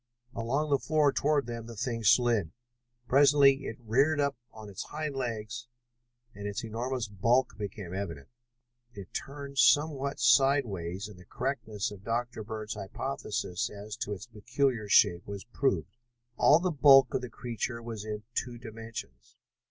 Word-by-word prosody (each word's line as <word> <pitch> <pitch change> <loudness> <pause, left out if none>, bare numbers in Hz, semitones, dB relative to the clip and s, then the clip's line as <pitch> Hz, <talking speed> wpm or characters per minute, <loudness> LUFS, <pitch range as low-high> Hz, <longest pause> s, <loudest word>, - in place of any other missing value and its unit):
Along 135 +7 -1
the 140 - +4
floor 150 -2 +2
toward 145 -2 +1
them 115 -1 -6
the 115 - -9
thing 115 +1 -3
slid. 110 -5 +3 0.6
Presently 140 0 +5
it 115 - -6
reared 135 +7 +2
up 140 -1 +1 0.2
on 110 -1 -11
its 100 -3 -7
hind 150 -2 -4
legs 115 -2 -4 0.7
and 100 0 -6
its 100 +1 -4
enormous 120 +2 -3
bulk 115 +6 +1
became 100 -3 -6
evident. 85 -8 -5 0.7
It 100 -3 -10
turned 140 -1 -5
somewhat 145 -2 +3
sideways 110 -8 +2
and 105 -4 -13
the 90 - -15
correctness 115 -6 -3
of 100 -1 -11
Dr. 115 0 -2
Bird's 110 0 -5
hypothesis 90 0 -3
as 105 +1 -8
to 105 -4 -3
its 100 - -8
peculiar 120 0 -1
shape 85 -2 +4
was 100 -1 -6
proved. 130 0 -1 0.4
All 145 - +6
of 170 - -5
the 185 - +1
bulk 135 -3 +6
of - - 0
the 125 - -6
creature 120 0 -4
was 115 -3 -6
in 105 -1 -5
two 120 0 -3
dimensions. 115 - -9
115 Hz, 155 wpm, -30 LUFS, 105-135 Hz, 0.7 s, All